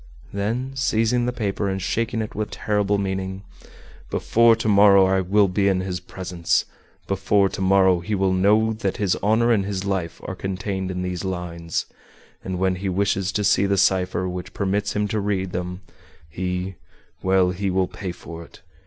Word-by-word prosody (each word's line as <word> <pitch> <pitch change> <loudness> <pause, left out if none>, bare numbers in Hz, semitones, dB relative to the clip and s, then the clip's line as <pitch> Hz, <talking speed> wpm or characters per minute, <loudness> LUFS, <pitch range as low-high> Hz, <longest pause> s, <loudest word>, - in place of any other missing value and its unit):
Then 115 +6 -2
seizing 120 -1 +1
the - - +1
paper 105 -4 -2
and 95 0 -2
shaking 115 +3 -1
it 110 - -7
with 105 0 -3
terrible 105 -1 0
meaning: 95 0 -3 0.7
"Before 115 0 +4
to 115 -1 -3
morrow 100 -2 +6
I 95 0 +2
will 100 +2 +3
be 100 +2 +1
in 95 -2 +2
his 90 -1 -3
presence; 90 -3 -1 0.4
before 100 0 +2
to - - -6
morrow 95 -1 +4
he 95 +5 -2
will 95 -1 +1
know 105 +4 +3
that 105 -3 -3
his 100 -4 +1
honor 110 +4 +3
and 105 -4 +3
his 95 -1 -3
life 95 -4 -2
are - - -4
contained 95 0 -3
in 90 0 -3
these 90 -1 -3
lines. 85 -3 -3 0.6
And 95 -1 -3
when 95 0 +1
he 95 +1 -3
wishes 95 0 0
to 105 - 0
see 100 0 +3
the 100 0 +1
cipher 95 0 +2
which 90 0 -6
permits 100 +1 -1
him 105 0 +1
to 110 - -1
read 95 -2 -1
them, 90 +1 -4 0.5
he 90 +3 -4 0.4
well, 95 -1 +3
he 95 +2 -2
will 95 0 +1
pay 95 -1 -6
for 85 -1 -9
it. - - -17
95 Hz, 180 wpm, -23 LUFS, 95-105 Hz, 0.7 s, morrow